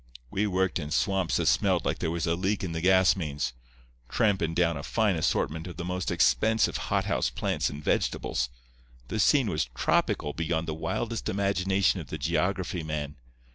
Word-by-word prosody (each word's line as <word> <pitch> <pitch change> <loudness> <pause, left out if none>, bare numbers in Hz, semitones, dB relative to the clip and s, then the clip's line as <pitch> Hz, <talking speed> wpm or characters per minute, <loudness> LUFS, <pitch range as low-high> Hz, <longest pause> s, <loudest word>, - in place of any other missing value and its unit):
We 105 +2 0
worked 95 -1 0
in 75 -3 -5
swamps 95 +1 +1
that 85 - 0
smelled 70 - +2
like - - -1
there - - -1
was 85 0 -1
a 85 - +1
leak 95 +4 -1
in 90 - -3
the 80 0 -3
gas 95 +1 +5
mains, 75 -8 -3 0.6
trampin' 95 -7 +1
down 85 -2 +2
a 70 - -5
fine 105 +4 +1
assortment 80 +1 -1
of 90 - -9
the 90 - -4
most 90 0 -2
expensive 110 +6 +2
hothouse - - +1
plants - - -1
and 75 +1 -8
vegetables. 65 -3 0 0.6
The 110 - -2
scene 135 +3 +4
was 75 -8 0
tropical 75 - +1
beyond 80 0 -2
the 80 - -2
wildest 115 +8 -3
imagination 100 -1 +1
of 80 - -7
the - - -5
geography 90 +2 -1
man. 75 -2 -4
90 Hz, 175 wpm, -28 LUFS, 80-95 Hz, 0.6 s, gas